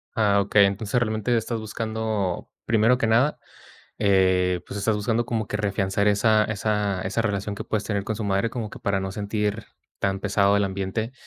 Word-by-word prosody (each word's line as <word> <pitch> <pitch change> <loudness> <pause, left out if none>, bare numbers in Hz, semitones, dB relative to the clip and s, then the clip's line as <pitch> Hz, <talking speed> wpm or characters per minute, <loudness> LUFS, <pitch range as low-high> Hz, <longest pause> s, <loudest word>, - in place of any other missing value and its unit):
Ah, 100 -2 +3
okey. 100 0 +4
Entonces, 100 +4 -1
realmente, 110 0 0
estás 115 0 -2
buscando, 110 -3 -3 0.2
primero 115 +3 +3
que 115 - +1
nada, 125 +7 +3 0.6
eh, 95 -2 +3
pues, 100 - -6
estás 105 +1 +1
buscando 115 +3 0
como 110 -3 -2
que 105 - -2
reafianzar 100 0 0
esa 110 +1 +3
esa 105 -2 -1
esa 100 +5 -1
relación 100 -1 -2
que - - -6
puedes 110 -1 -2
tener 100 -2 -2
con 110 - -3
su 110 - -4
madre 100 +3 +1
como 115 -4 -4
que - - -10
para 100 -1 -1
no 95 0 -4
sentir 105 +1 -2 0.4
tan 95 0 0
pesado 100 0 +2
el 100 - +2
ambiente. 100 +5 -3
105 Hz, 185 wpm, -24 LUFS, 100-110 Hz, 0.6 s, okey